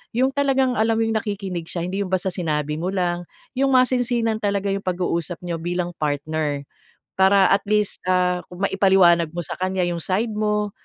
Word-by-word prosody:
Yung 260 Hz, +3 st, +2 dB
talagang 270 Hz, -2 st, +2 dB
alam 225 Hz, +1 st, +2 dB
mo 225 Hz, -, +2 dB
yung 225 Hz, 0 st, 0 dB
nakikinig 195 Hz, -5 st, -4 dB
siya 170 Hz, -, -3 dB
hindi 190 Hz, +3 st, -3 dB
yung -, -, -5 dB
basta 190 Hz, 0 st, +1 dB
sinabi 150 Hz, -4 st, -1 dB
mo 175 Hz, -, -2 dB
lang 175 Hz, -2 st, -1 dB, 0.3 s
yung 270 Hz, 0 st, +2 dB
masinsinan 245 Hz, -3 st, +2 dB
talaga 200 Hz, -1 st, 0 dB
yung 195 Hz, -, -1 dB
pag-uusap 175 Hz, -2 st, -2 dB
niyo 170 Hz, -1 st, -2 dB
bilang 175 Hz, +1 st, -2 dB
partner. 150 Hz, 0 st, -2 dB, 0.6 s
Para 190 Hz, 0 st, +5 dB
at 195 Hz, -, +2 dB
least 210 Hz, -1 st, +1 dB
ah, 180 Hz, -1 st, +2 dB
kung 180 Hz, +2 st, -7 dB
maipaliwanag 190 Hz, -4 st, +4 dB
mo 175 Hz, -, -3 dB
sa -, -, -5 dB
kanya 185 Hz, 0 st, 0 dB
yung 170 Hz, -1 st, -3 dB
side 215 Hz, +5 st, 0 dB
mo, 210 Hz, -1 st, 0 dB
190 Hz, 185 wpm, -22 LUFS, 175-215 Hz, 0.6 s, Para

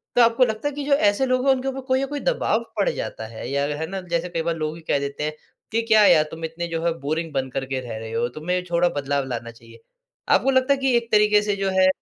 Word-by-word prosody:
तो 245 Hz, -, +6 dB
आपको 235 Hz, +2 st, +5 dB
लगता 220 Hz, +3 st, -2 dB
है 290 Hz, -, -3 dB
कि 290 Hz, -, -4 dB
जो 285 Hz, -, +2 dB
ऐसे 210 Hz, -2 st, +3 dB
लोग 255 Hz, 0 st, +1 dB
है -, -, +7 dB
उनके 260 Hz, 0 st, -3 dB
ऊपर 270 Hz, 0 st, -3 dB
कोई 260 Hz, -1 st, +2 dB
ना 275 Hz, -, 0 dB
कोई 290 Hz, -, -2 dB
दबाव -, -, 0 dB
पड़ -, -, +2 dB
जाता 110 Hz, -, -5 dB
है 115 Hz, -, -6 dB
या 140 Hz, +1 st, 0 dB
है 160 Hz, +1 st, -3 dB
ना, 190 Hz, +2 st, -5 dB
जैसे 175 Hz, 0 st, -2 dB
कई 170 Hz, -1 st, -2 dB
बार 165 Hz, 0 st, -1 dB
लोग 155 Hz, 0 st, -3 dB
ही 165 Hz, -, -11 dB
कह 140 Hz, -, +2 dB
देते 140 Hz, +1 st, -4 dB
हैं 155 Hz, 0 st, -2 dB, 0.4 s
कि 230 Hz, -, +1 dB
क्या 215 Hz, -2 st, +6 dB
यार 155 Hz, -, +6 dB
तुम 160 Hz, 0 st, -5 dB
इतने 165 Hz, +2 st, -5 dB
जो 165 Hz, -1 st, -3 dB
है 170 Hz, -, +2 dB
बोरिंग 160 Hz, +3 st, -2 dB
बन 135 Hz, -1 st, -1 dB
कर 135 Hz, +1 st, -3 dB
के 135 Hz, 0 st, -3 dB
रह 120 Hz, -3 st, -6 dB
रहे 110 Hz, 0 st, -7 dB
हो, 115 Hz, +1 st, 0 dB
तुम्हें 180 Hz, +7 st, -2 dB
थोड़ा 175 Hz, +1 st, +3 dB
बदलाव 140 Hz, -2 st, -1 dB
लाना 120 Hz, -2 st, -5 dB
चाहिए। 115 Hz, 0 st, -17 dB, 0.5 s
आपको 270 Hz, -, +4 dB
लगता 260 Hz, +1 st, +3 dB
है -, -, -1 dB
कि 265 Hz, -2 st, +2 dB
एक 235 Hz, -1 st, -4 dB
तरीके 210 Hz, 0 st, +5 dB
से 205 Hz, -1 st, -1 dB
जो 195 Hz, -1 st, -1 dB
है 185 Hz, -, +6 dB
170 Hz, 285 wpm, -23 LUFS, 140-235 Hz, 0.5 s, है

